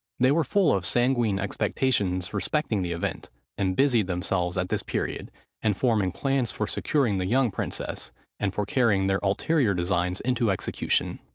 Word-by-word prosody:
They 130 +2 +4
were 160 +3 +3
full 195 0 +3
of 95 - -2
sanguine 120 0 +2
expectations 100 -3 -1
respecting 140 -10 0
the 90 -1 -2
event, 85 0 -4 0.3
and 95 -2 0
busied 120 -7 +3
themselves 90 -1 -1
at 90 0 -1
this - - 0
period, - - -3 0.3
in 105 -3 +1
forming 105 -5 +1
plans 135 -1 0
for 110 - -2
securing 115 -3 0
the 90 - -1
young 125 +2 +2
princes, - - -4 0.3
and 100 -2 0
for 105 +1 -2
carrying 105 -7 +2
their 95 0 +1
ulterior 105 +3 +1
designs 90 +1 0
into 125 -3 0
execution. 95 - -1
105 Hz, 165 wpm, -26 LUFS, 95-125 Hz, 0.3 s, They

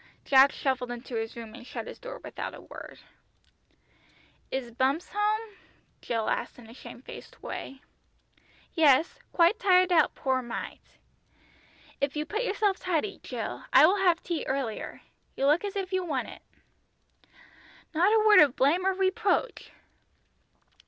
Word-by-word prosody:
Jack 275 0 +6
shuffled 260 -2 -2
into 245 +1 -8
his 225 -1 -3
room 230 -2 -9
and - - -11
shut 250 - -7
his - - -10
door - - -8
without - - -6
a - - -12
word. - - -11 1.5
"Is 260 -3 -4
Bumps 265 +7 0
home?" 420 0 -1 0.4
Jill 225 -2 -2
asked - - -2
in 240 -2 -14
a 225 - -13
shamefaced 245 0 -12
way. 270 -1 -7 0.9
"Yes, 310 -1 +3
quite 345 +6 +3
tired 370 -4 +4
out, 335 -3 +3
poor 260 -1 0
mite. 240 -1 -8 1.0
If 280 +1 -1
you 300 0 -2
put 425 +8 -3
yourself 410 -3 0
tidy, 365 +3 -2
Jill, 220 - -6
I 270 +3 +8
will 375 +5 +3
have 355 -3 +2
tea 340 -3 -3
earlier. 265 -5 -3 0.4
You 275 - 0
look 300 +6 +3
as 405 -1 -4
if 385 -1 -4
you 370 0 +1
want 290 -7 -3
it." - - -12 1.5
Not 350 +6 +3
a 435 -1 +3
word 425 -1 +8
of 285 -4 +5
blame 335 +8 +2
or 385 - +1
reproach! 390 +5 0
315 Hz, 150 wpm, -28 LUFS, 260-385 Hz, 1.5 s, I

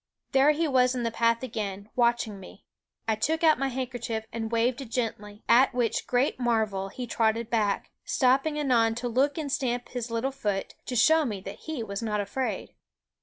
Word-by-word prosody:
There 270 +1 +5
he 310 +2 +2
was 255 -2 +3
in 245 - -2
the 230 - 0
path 230 +1 +1
again, 205 -4 -5
watching 235 -4 +1
me. 190 +2 -13 0.4
I 220 - +3
took 320 +9 -1
out 310 -4 +5
my 275 - +1
handkerchief 245 -4 -3
and 225 -1 -3
waved 235 +3 +1
it 260 - -8
gently; 215 -3 -4
at 255 +1 +5
which 240 -3 0
great 250 +3 +1
marvel 220 -5 0
he 250 +5 -6
trotted 225 0 0
back, 210 -4 0
stopping 270 +4 +2
anon 235 -6 +2
to 245 +1 -3
look 270 +5 +1
and 300 -3 -3
stamp 245 -3 -1
his 245 -1 -4
little 230 +4 -1
foot, 205 -7 -3
to 250 - -3
show 320 +7 +5
me 215 -8 -3
that - - -9
he 295 -7 -2
was 200 -1 -5
not 215 -2 -1
afraid. 205 +6 -3
240 Hz, 190 wpm, -27 LUFS, 220-260 Hz, 0.4 s, There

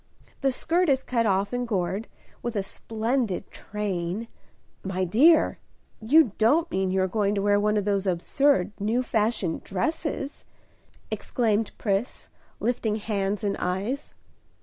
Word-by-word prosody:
The 275 - +3
skirt 340 +6 +1
is 265 -1 +2
cut 230 -3 +1
off 200 +2 +1
and 245 0 -1
gored, 195 0 -1 0.3
with 240 -1 -4
a 200 - 0
splendid 225 0 -2
train 200 0 -3 0.3
" - - -38
"My 185 +1 0
dear, 290 - +5 0.4
you 270 +2 +5
don't 305 +10 +3
mean 190 0 0
you 190 0 +2
are - - +1
going 205 +1 0
to 200 - 0
wear 205 0 +4
one 210 +1 +2
of 205 - 0
those 200 -1 0
absurd, 190 +4 +2
new 225 +5 +1
fashioned 215 -7 0
dresses?" 285 - -3 0.7
exclaimed 225 -3 0
Pris, 205 +3 -2 0.3
lifting 230 -3 0
hands 205 -1 -2
and 200 -1 0
eyes. 200 +11 -3
210 Hz, 145 wpm, -26 LUFS, 195-245 Hz, 0.7 s, dear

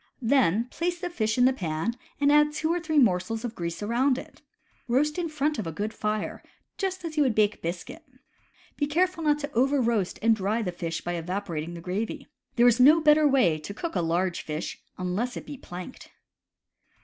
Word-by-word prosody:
Then 230 -5 +3
place 350 +2 -2
the 355 0 -4
fish 220 -8 -1
in 245 - +5
the 260 - +4
pan 170 0 -2 0.3
and 285 0 +4
add 300 0 +5
two 320 +2 0
or 350 - 0
three 315 -2 -2
morsels 225 -1 +2
of 235 - -4
grease 170 0 -4
around 250 +5 +2
it. - - -10 0.5
Roast 300 +7 +1
in 340 -2 -2
front 300 -1 -1
of 200 - -3
a - - -3
good 210 +7 -4
fire, 215 0 -3 0.4
just 375 -3 -2
as 315 -1 -6
you - - +4
would 250 -6 +1
bake 210 -1 +2
biscuit. 175 - -5 0.7
Be 290 - 0
careful 345 +3 +1
not 295 -1 +3
to 285 0 -5
overroast 235 -6 +1
and 225 0 +5
dry 215 +3 -1
the 180 - -2
fish 165 -2 -4
by 175 - -3
evaporating 175 -1 -4
the 170 - -8
gravy. 215 - -3 0.3
There 240 0 +5
is 240 0 +4
no 295 +6 +7
better 305 -1 +5
way 215 - +3
to 200 +6 -8
cook 330 +7 -4
a - - +2
large 170 +2 0
fish, 155 +1 -5 0.2
unless 190 +7 -2
it - - -7
be 290 - -7
planked. 185 -4 -9
235 Hz, 200 wpm, -27 LUFS, 185-295 Hz, 0.7 s, no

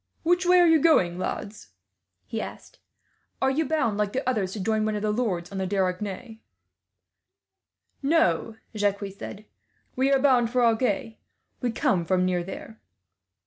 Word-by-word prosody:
"Which 355 +2 +2
way 360 0 +6
are 350 - +6
you 325 -1 +5
going, 180 - +3
lads?" 195 - -5 0.5
he 225 - -4
asked. - - -10 0.6
"Are 265 - +2
you 310 +4 0
bound, 230 -10 0
like 205 -1 0
the 265 0 -2
others, 210 -7 0
to 215 - -5
join 215 +2 0
one 215 0 -1
of 210 - -3
the 215 - +1
lords 200 -7 -2
on 195 - -4
the 190 - -1
Dordogne?" 195 +4 -3 1.6
"No," 250 - +1 0.2
Jacques 205 -1 0
said, 205 +1 -9 0.5
"we 265 +2 +2
are 275 - +5
bound 255 -4 +3
for 245 0 +2
Agen. 225 -1 0 0.4
We 245 -2 0
come 190 -5 +1
from 185 +1 +1
near 180 -1 0
there." 205 +4 -9
220 Hz, 160 wpm, -26 LUFS, 195-260 Hz, 1.6 s, way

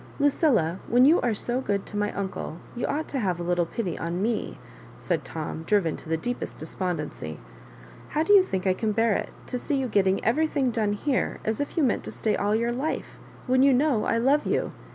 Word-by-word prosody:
" - - -20
Lucilla^ 260 - +2
when 245 +2 +5
you 320 +5 +5
are 235 -3 +1
so 240 +5 -1
good 200 -5 -1
to - - -9
my 205 0 0
uncle, 190 -4 -4 0.2
you 240 - -2
ought 310 +2 -2
to 275 - -3
have 185 -6 -1
a - - -3
little 175 -1 +1
pity 185 -3 -3
on 170 +2 -2
me," 220 +3 -1 0.4
said - - -1
Tom, 160 0 -5
driven 170 -2 +1
to - - -11
the 160 - +1
deepest 245 +9 -4
despondency. 155 - -4 0.7
"How 310 - 0
do 410 - +4
you 400 - +9
think 190 - -3
I 190 - +4
can 215 +2 -1
bear 225 0 +3
it, - - -2 0.2
to 250 - -3
see 290 - -1
you 265 -1 0
getting 195 -3 +2
every 305 +8 +3
thing 275 -5 0
done 215 -3 0
here, 260 +5 -1
as 220 +4 0
if 285 - -4
you 320 - +3
meant 250 - +1
to - - -5
stay 215 - 0
all 205 +1 +1
your 235 +2 +1
life 265 +6 -3
— - - -21
when 255 0 +3
you 275 0 +6
know 265 -5 +2
I 230 - +1
love 275 +6 +2
you - - 0
225 Hz, 235 wpm, -26 LUFS, 190-265 Hz, 0.7 s, you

